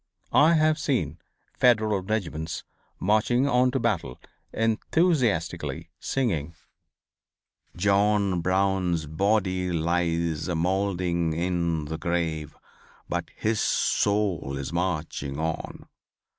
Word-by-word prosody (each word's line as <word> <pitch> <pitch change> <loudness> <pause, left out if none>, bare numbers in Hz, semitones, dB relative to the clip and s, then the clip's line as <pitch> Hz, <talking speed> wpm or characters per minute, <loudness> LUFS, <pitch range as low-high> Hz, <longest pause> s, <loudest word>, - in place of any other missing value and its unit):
I 155 +3 +6
have 155 0 +3
seen 85 - -1 0.3
Federal 110 -5 +3
regiments 90 -6 -3 0.4
marching 110 +6 +2
on 125 -1 +3
to 135 +1 -1
battle 65 - -1 0.3
enthusiastically 115 - 0
singing: 85 - -1 1.2
"John 100 -1 +2
Brown's 95 -2 +1
body 95 +2 0
lies 85 -1 0
a 90 - -1
mould'ring 90 -1 0
in 85 -2 -1
the 80 +2 -5
grave, 80 -4 -2 0.5
But - - -3
his 110 0 0
soul 100 -9 +1
is 70 +4 -5
marching 80 -5 -2
on." 80 0 -4
90 Hz, 95 wpm, -26 LUFS, 80-105 Hz, 1.2 s, I